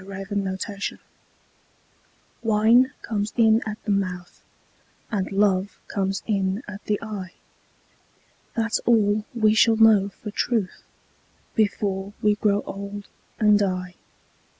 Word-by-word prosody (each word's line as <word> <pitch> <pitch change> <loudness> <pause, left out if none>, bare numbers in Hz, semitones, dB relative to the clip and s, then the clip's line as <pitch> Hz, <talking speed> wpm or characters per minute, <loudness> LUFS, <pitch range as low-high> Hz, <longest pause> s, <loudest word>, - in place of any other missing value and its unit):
A - - -12
DRINKING 195 0 -4
SONG 200 0 -4 1.4
Wine 225 +3 +4
comes 210 -1 -2
in 225 -1 +5
at 215 0 -4
the 210 - -1
mouth 185 -3 -3 0.7
And 195 -4 -2
love 195 -1 +1
comes 195 -1 -1
in 195 +1 -1
at 205 0 -8
the 210 -1 0
eye; 200 -5 -6 1.2
That's 225 -1 0
all 215 -2 +3
we 215 -2 +4
shall 225 0 +4
know 215 -3 +5
for 210 +2 -9
truth 220 -3 -2 0.7
Before 200 -2 -1
we 210 -2 +3
grow 205 -1 +1
old 200 +1 -7 0.3
and 210 -2 +5
die. 185 -2 -1
205 Hz, 120 wpm, -24 LUFS, 195-220 Hz, 1.4 s, in